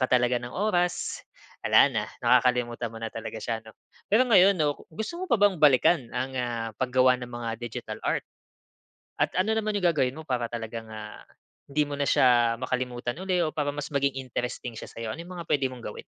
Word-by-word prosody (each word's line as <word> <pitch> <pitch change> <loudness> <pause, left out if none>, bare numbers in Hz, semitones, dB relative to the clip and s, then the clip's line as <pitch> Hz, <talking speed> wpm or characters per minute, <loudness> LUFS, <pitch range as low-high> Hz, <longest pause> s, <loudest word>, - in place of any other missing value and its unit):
ka 130 - +2
talaga 125 -1 +3
ng 120 0 -7
oras, 180 -3 0 0.4
wala - - +6
na - - -1 0.2
nakakalimutan 120 -2 +2
mo 115 - -9
na 115 - -3
talaga 110 0 -7
siya 110 0 -3
'no. 110 - -13 0.4
Pero 250 +3 +5
ngayon 195 -2 +7
'no, 145 -1 +2 0.2
gusto 220 - -4
mo 370 - -4
pa 235 - +1
bang 200 -3 +4
balikan 145 -2 +4
ang, 130 0 -3
ah, 120 -2 -2
paggawa 130 0 +3
ng 125 -1 -7
mga 120 -1 -4
digital 115 -2 -6
art? - - 0 1.0
At - - +1
ano 220 +3 +1
naman 215 -1 0
yung 175 - +4
gagawin 135 -6 +1
mo 160 - -8
para 120 -2 0
talagang, 115 -1 -5
ah, 105 0 -9 0.4
'di 145 +1 0
mo 145 - -4
na 140 - 0
siya 120 -3 +4
makalimutan 125 0 -2
uli 185 -1 0
o 160 - +1
para 145 -1 0
mas 145 0 -5
maging 140 -1 0
interesting 120 -1 -4
siya - - -7
sa'yo, 115 -1 -6
ano 165 - -7
yung 180 +1 -9
mga 165 - -8
puwede 135 -2 +2
mong 125 -2 -10
gawin? - - -8
130 Hz, 205 wpm, -27 LUFS, 120-160 Hz, 1.0 s, ngayon